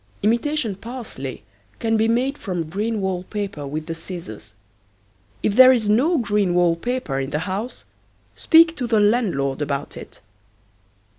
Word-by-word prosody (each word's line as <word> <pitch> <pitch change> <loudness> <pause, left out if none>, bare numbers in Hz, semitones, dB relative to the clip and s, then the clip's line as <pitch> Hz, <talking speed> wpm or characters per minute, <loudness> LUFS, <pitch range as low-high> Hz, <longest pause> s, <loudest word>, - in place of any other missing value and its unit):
Imitation 235 +2 +1
parsley 215 - -7 0.3
can 225 -1 0
be 220 0 +2
made 250 +5 +1
from 180 - -4
green 210 +4 -2
wall 190 -2 -1
paper 200 -9 -5
with 155 +2 -4
the 165 - -4
scissors. 160 - -9 0.9
If 205 - +1
there 255 +1 +9
is 220 -5 +2
no 295 +11 +3
green 205 -6 +1
wall 175 -1 +3
paper 205 - -3
in 135 0 -3
the 150 - -2
house 205 +6 -4 0.5
speak 330 0 +5
to 250 - -2
the 225 -2 +3
landlord 195 - +1
about 145 -1 -3
it. - - -11
205 Hz, 150 wpm, -22 LUFS, 165-240 Hz, 0.9 s, there